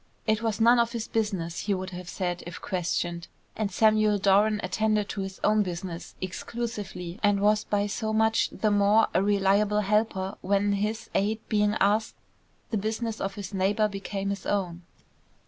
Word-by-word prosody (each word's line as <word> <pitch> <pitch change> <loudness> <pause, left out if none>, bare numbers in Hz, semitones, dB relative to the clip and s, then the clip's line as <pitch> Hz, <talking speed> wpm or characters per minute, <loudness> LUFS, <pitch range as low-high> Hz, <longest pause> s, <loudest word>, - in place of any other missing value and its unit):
"It 220 0 +1
was 225 -2 -1
none 235 +2 +6
of 235 0 +1
his 230 -1 -3
business," 190 -7 -2
he 200 - +2
would 185 0 -5
have 180 -1 -8
said 175 -1 -3
if 175 - -7
questioned, 175 -1 -2 0.3
and 215 -2 -1
Samuel 215 -1 +3
Doran 205 +2 +3
attended 210 +2 0
to 200 - -3
his 190 0 -6
own 215 0 +4
business 175 -2 -5
exclusively 190 -2 -5
and 205 -1 +3
was 210 +1 +2
by 205 -1 0
so 220 +2 -2
much 220 0 +2
the 215 - 0
more 205 +2 +4
a 180 - +3
reliable 205 +1 +2
helper 205 -2 0
when, 200 +1 +1
his 215 +3 -2
aid 215 +3 +1
being 210 0 +2
asked, 215 +2 +2 0.6
the 220 - +1
business 220 +2 -3
of 195 0 -3
his 200 0 -7
neighbour 200 +3 +2
became 200 0 -4
his 200 -1 -5
own. 180 -4 -1
205 Hz, 170 wpm, -27 LUFS, 190-215 Hz, 0.6 s, none